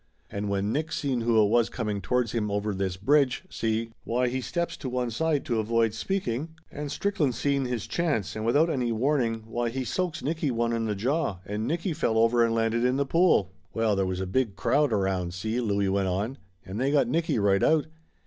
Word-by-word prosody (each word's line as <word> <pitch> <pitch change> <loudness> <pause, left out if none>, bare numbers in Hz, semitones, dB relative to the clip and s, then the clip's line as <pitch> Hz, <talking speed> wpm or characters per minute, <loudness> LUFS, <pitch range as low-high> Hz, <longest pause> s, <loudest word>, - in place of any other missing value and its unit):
And 100 0 -3
when 100 +1 0
Nick 155 +4 -1
seen 135 -6 -1
who 115 -1 +3
it 100 - +2
was 115 +1 +3
coming 105 -4 -3
towards 120 +4 0
him 110 -3 -1
over 105 +1 -1
this 95 -1 -2
bridge, 135 - +2
see, 115 0 -1
why 125 +2 0
he 130 +1 -2
steps 170 +4 -2
to 135 - -5
one 125 -1 -1
side 155 +4 0
to 115 -3 0
avoid 115 0 +1
speaking, 160 - -2 0.2
and 145 -1 -5
Strickland 155 - 0
seen 140 -2 0
his 125 -3 -3
chance 125 - -1
and 110 - -4
without 145 +8 +3
any 125 -7 0
warning, 115 -2 0
why 120 +1 -2
he 130 +3 -3
soaks 180 0 -2
Nicky 155 0 -1
one 115 -1 0
in 115 -1 -1
the 105 -2 -1
jaw 130 - 0
and 105 +2 -3
Nicky 170 +4 -1
fell 130 -8 0
over 115 +1 +4
and 115 0 +1
landed 115 +1 +1
in 125 +1 +2
the 140 +1 +1
pool." 165 - +3 0.2
"Well, 115 -2 +2
there 95 -1 +1
was 95 0 -2
a - - -1
big 110 +1 0
crowd 145 +8 +2
around, 95 -4 0
see?" 110 +6 -2
Louie 100 -3 +1
went 95 0 +1
on. 105 +9 -2 0.3
"And 100 +5 -5
they 135 - +2
got 145 - +3
Nicky 165 -4 0
right 100 -2 +3
out. 155 -1 +3
115 Hz, 215 wpm, -27 LUFS, 105-140 Hz, 0.3 s, over